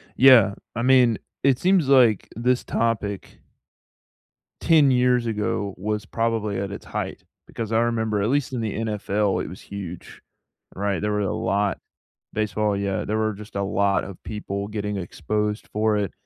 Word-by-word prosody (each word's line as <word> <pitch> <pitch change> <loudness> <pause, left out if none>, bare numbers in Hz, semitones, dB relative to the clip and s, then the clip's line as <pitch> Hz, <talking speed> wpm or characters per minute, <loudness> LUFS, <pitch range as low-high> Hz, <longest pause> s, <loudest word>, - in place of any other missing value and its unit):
Yeah. 125 -7 +7 0.2
I 115 - -2
mean, 125 -3 +4 0.3
it 135 -2 +3
seems 185 -5 +3
like 120 -7 +4
this 125 +3 +1
topic 105 -4 -2 1.2
10 155 -5 +5
years 125 -1 +3
ago 105 -2 -2
was 105 +2 -3
probably 115 -2 -1
at 100 0 -3
its 100 - -8
height. - - -5 0.2
Because 115 -1 -5
I 110 - +3
remember, 110 -3 0
at 105 - +1
least 140 0 0
in 120 - -2
the 110 -2 -2
NFL, 105 -3 -1
it - - -6
was 90 - -10
huge, 95 -4 -8 0.5
right? 100 0 -1
There 105 - 0
were 105 0 0
a 95 - -1
lot 100 0 0 0.6
Baseball, 105 -1 0
yeah, 100 -1 -2
there 110 - -1
were 110 0 +1
just 105 0 -12
a 100 - 0
lot 100 0 +1
of 95 -2 -9
people 100 -2 -4
getting 105 -1 -3
exposed 105 +3 -3
for 110 0 +1
it, 100 -3 -1
105 Hz, 165 wpm, -24 LUFS, 100-115 Hz, 1.2 s, Yeah